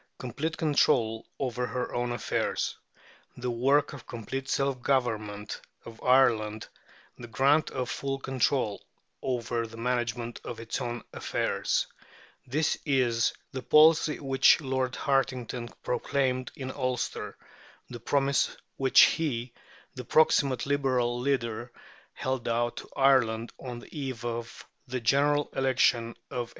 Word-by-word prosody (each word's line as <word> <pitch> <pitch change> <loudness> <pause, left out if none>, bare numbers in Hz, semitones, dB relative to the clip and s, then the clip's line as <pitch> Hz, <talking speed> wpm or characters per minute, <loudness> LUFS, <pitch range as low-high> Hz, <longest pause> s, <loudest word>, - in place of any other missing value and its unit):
"Complete 155 +6 -4
control 115 -7 +2
over 125 -2 -2
her 125 +3 -3
own 120 0 -1
affairs," 120 - -1 0.6
"the 125 0 -2
work 135 +6 +2
of 140 - -10
complete 130 +3 -5
self 135 -2 0
government 110 -6 -1 0.2
of 115 -1 -11
Ireland, 115 -5 +3 0.5
the 120 - -8
grant 140 +7 +3
of 130 -2 -3
full 135 +2 -3
control 130 -4 0 0.4
over 120 -2 -2
the 115 +1 -12
management 120 -1 -2
of 120 - -6
its 115 +3 -4
own 120 -2 -4
affairs:" - - 0 0.6
this 150 +5 0
is 125 -5 +2 0.2
the 130 - -5
policy 155 +3 +5
which 135 -2 +5
Lord 130 -3 -1
Hartington 125 -3 -1
proclaimed 130 -1 -1
in 130 -1 -5
Ulster, 130 -2 -3 0.5
the 120 - -8
promise 140 +3 +1 0.2
which 135 -1 +6
he, 125 -7 +2 0.4
the 125 - -7
proximate 140 -4 +3
Liberal 130 -4 +1
leader, 120 -3 -1 0.4
held 130 -2 -3
out 120 +1 0
to - - -8
Ireland 125 -5 +3
on 125 -2 -6
the 120 - -13
eve 130 -5 -4
of 120 0 -5 0.2
the 130 +1 -3
General 145 +5 +2
Election 120 -3 +2 0.2
of 125 -3 -2
1885. - - -19
125 Hz, 130 wpm, -28 LUFS, 120-135 Hz, 0.6 s, which